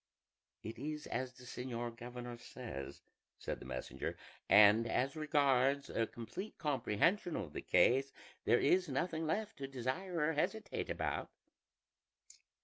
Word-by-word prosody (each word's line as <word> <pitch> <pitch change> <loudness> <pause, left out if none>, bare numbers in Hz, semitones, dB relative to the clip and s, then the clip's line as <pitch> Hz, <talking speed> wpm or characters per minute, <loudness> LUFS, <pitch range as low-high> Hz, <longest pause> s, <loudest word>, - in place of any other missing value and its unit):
"It 110 +1 -6
is 150 +2 -4
as 130 +1 -3
the 125 - -15
señor 120 -1 -4
governor 120 0 -7
says," 75 - -7 0.3
said - - -4
the - - -10
messenger; - - -4 0.3
"and 105 +2 +8
as 135 +6 +1
regards 140 -3 +2
a 115 - +1
complete 120 - -7
comprehension 150 - +1
of 80 -7 -4
the - - -4
case, 135 +2 +4 0.3
there - - +5
is 180 0 +3
nothing 165 -2 -1
left 215 +7 -1
to 135 - -4
desire 135 +8 -3
or 155 +2 +2
hesitate 195 +8 -1
about." - - -2
135 Hz, 135 wpm, -36 LUFS, 120-160 Hz, 0.3 s, and